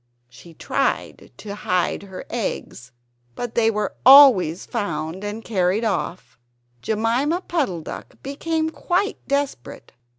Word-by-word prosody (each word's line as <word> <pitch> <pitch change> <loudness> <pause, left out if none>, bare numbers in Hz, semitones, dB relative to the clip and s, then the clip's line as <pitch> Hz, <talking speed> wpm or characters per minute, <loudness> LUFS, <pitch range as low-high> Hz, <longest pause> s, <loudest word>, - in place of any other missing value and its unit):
She 165 +7 -15
tried - - -2
to 205 -2 -7
hide 180 -3 -1
her 190 -2 -9
eggs; 205 - -5 0.4
but 245 -2 -5
they 225 -1 +3
were 210 -2 -2
always 255 - +7
found 170 -4 -4
and 210 +2 -5
carried 190 0 +1
off. 185 - -3 0.4
Jemima 235 - 0
Puddle 280 - -2
duck - - -9
became 315 +3 -2
quite 380 +6 -1
desperate. 280 - -3
220 Hz, 120 wpm, -22 LUFS, 180-275 Hz, 0.4 s, always